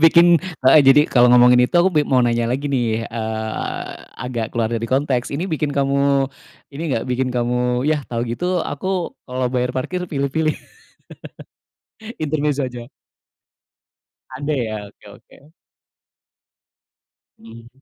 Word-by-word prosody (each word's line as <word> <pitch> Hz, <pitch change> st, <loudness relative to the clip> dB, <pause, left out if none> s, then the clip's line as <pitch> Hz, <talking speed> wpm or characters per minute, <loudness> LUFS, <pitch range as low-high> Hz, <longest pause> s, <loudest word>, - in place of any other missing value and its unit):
Bikin 170 Hz, +1 st, +7 dB, 0.4 s
heeh, 135 Hz, +4 st, +7 dB
jadi, 135 Hz, +2 st, +7 dB
kalo 125 Hz, -1 st, +5 dB
ngomongin 125 Hz, 0 st, +6 dB
itu -, -, -6 dB
aku 190 Hz, +2 st, +3 dB
be 150 Hz, -, +4 dB
mau 130 Hz, -2 st, +3 dB
nanya 120 Hz, -1 st, +1 dB
lagi 135 Hz, +4 st, -2 dB
nih, 115 Hz, -4 st, -1 dB
eee, 110 Hz, -1 st, -4 dB, 0.3 s
agak 120 Hz, -3 st, -4 dB
keluar 115 Hz, -1 st, 0 dB
dari 115 Hz, 0 st, -2 dB
konteks. 130 Hz, 0 st, -1 dB
Ini 160 Hz, -, -2 dB
bikin 150 Hz, -2 st, -1 dB
kamu, 140 Hz, 0 st, +1 dB, 0.5 s
ini 150 Hz, -, -5 dB
nggak, 115 Hz, -, -2 dB
bikin 130 Hz, +1 st, 0 dB
kamu, 125 Hz, +1 st, 0 dB
yah, 150 Hz, -, +1 dB
tau 115 Hz, -1 st, -3 dB
gitu 175 Hz, +9 st, -2 dB
aku 185 Hz, +3 st, -3 dB
kalo 130 Hz, 0 st, -4 dB
bayar 125 Hz, 0 st, -1 dB
parkir 180 Hz, +8 st, -3 dB
pilih-pilih? 155 Hz, +1 st, -1 dB, 1.7 s
Intermezo 145 Hz, -2 st, -1 dB
aja. 120 Hz, -1 st, -8 dB, 1.5 s
Ada 145 Hz, +3 st, -3 dB
ya? 110 Hz, -3 st, -3 dB, 0.2 s
Oke, -, -, -27 dB
oke. 150 Hz, +3 st, -22 dB, 1.9 s
Mmm, 115 Hz, +1 st, -14 dB
130 Hz, 130 wpm, -20 LUFS, 120-145 Hz, 1.9 s, Bikin